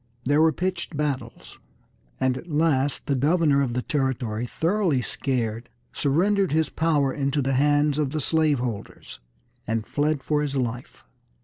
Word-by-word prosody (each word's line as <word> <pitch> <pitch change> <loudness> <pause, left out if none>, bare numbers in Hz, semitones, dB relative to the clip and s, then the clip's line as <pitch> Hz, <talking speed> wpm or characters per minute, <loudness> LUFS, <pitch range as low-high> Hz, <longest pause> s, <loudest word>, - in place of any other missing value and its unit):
There 145 +3 +3
were 160 0 +5
pitched 170 -1 -3
battles, 135 -6 -4 0.6
and 130 -1 +1
at 175 +7 -9
last 145 -3 +1
the 140 - 0
governor 145 +1 +3
of 130 -4 -1
the 125 - -1
territory, 125 -5 -1
thoroughly 165 - 0
scared, 120 -3 -2 0.2
surrendered 185 +6 +1
his 155 -2 +1
power 150 -5 +1
into 140 0 -1
the 135 0 0
hands 145 +2 +2
of 145 -3 +1
the 155 +3 -3
slave 155 0 +2
holders, 120 - -6 0.5
and 110 0 -1
fled 145 +1 -1
for 150 +2 +1
his 145 -2 -2
life. 125 -1 -4
145 Hz, 150 wpm, -24 LUFS, 130-155 Hz, 0.6 s, were